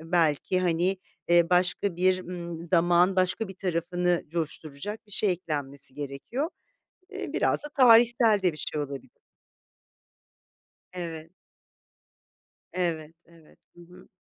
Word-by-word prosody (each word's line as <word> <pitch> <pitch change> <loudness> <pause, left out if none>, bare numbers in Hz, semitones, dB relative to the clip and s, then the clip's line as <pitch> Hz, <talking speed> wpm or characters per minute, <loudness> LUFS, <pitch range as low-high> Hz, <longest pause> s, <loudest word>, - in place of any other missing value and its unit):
belki, 165 +1 +1
hani, 180 +2 +1 0.3
eee, 175 0 +4
başka 180 +1 +1
bir, 185 +1 +3
ımm, 170 -2 -7
damağın 175 +2 +3
başka 185 +3 0
bir 190 - -9
tarafını 175 -1 -1
coşturacak 160 +5 -5
bir 205 - -15
şey 200 -2 +2
eklenmesi 145 -6 -2
gerekiyor. 145 - -4 0.6
Eee, 395 - -6
biraz - - +1
da 295 - -7
tarihsel 235 -4 +5
de 180 -2 +2
bir 155 - -12
şey 150 - -3
olabilir. 140 -3 -8 1.7
Evet. 165 -3 -7 1.4
Evet, 165 -3 -2
evet. 165 -2 -21 0.2
Hı - - -15
hı. 180 +1 -17
175 Hz, 120 wpm, -27 LUFS, 160-185 Hz, 1.7 s, tarihsel